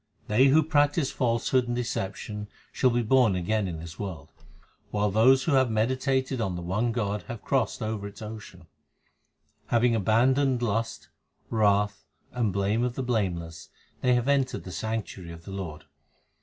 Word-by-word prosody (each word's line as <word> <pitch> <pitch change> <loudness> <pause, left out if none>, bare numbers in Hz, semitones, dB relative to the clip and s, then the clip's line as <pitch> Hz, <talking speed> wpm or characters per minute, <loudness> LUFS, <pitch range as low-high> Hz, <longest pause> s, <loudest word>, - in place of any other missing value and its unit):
They 115 +6 +4
who 155 +4 +5
practise 145 -1 +2
falsehood 120 0 +1
and 120 - -1
deception 105 -2 -4 0.2
shall 130 - +2
be 120 0 +1
born 120 -3 +4
again 100 +3 0
in 85 -3 -4
this 80 +1 -9
world, 90 -9 -6 0.6
While 105 0 0
those 130 +6 +5
who 165 - 0
have 130 -3 +4
meditated 130 +3 0
on 95 -5 -1
the 85 - -5
one 105 +7 0
God 105 -3 -2
have 120 -3 -7
crossed 135 -3 0
over 110 -2 -3
its 100 - -12
ocean; 110 0 -9 1.0
Having 120 0 +3
abandoned 125 +4 +2
lust, 115 +1 -2 0.4
wrath, 105 -3 +2 0.3
and 120 -5 0
blame 100 +4 0
of 125 -1 -1
the 130 - -2
blameless, 90 -9 -2 0.3
they 125 -1 +3
have 120 +1 0
entered 140 -2 +1
the 90 - -8
sanctuary 100 -4 -4
of 85 0 -12
the 100 - -8
Lord. 90 -6 -6
110 Hz, 160 wpm, -27 LUFS, 100-125 Hz, 1.0 s, who